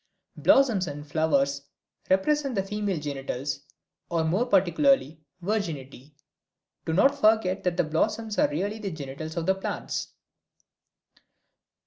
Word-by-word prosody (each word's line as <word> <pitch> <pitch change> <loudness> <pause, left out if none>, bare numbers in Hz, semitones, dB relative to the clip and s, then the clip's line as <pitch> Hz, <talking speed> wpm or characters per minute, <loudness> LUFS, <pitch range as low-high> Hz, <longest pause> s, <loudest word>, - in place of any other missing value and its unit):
Blossoms 235 -10 +4
and 145 0 -6
flowers 140 -2 +1 0.5
represent 275 +8 +2
the 195 - +1
female 205 -3 -2
genitals, 140 -2 -4 0.5
or 165 -1 +1
more 185 +10 +1
particularly, 195 - +3 0.2
virginity. 150 - -4 0.7
Do 160 - -1
not 275 - +5
forget 215 -7 +2
that 180 -1 0
the 175 - +3
blossoms 210 +8 -1
are - - +4
really 200 +8 -2
the 205 -2 -3
genitals 155 0 -7
of 165 - -1
the 190 - +4
plants. 195 - -4
180 Hz, 120 wpm, -26 LUFS, 150-210 Hz, 0.7 s, not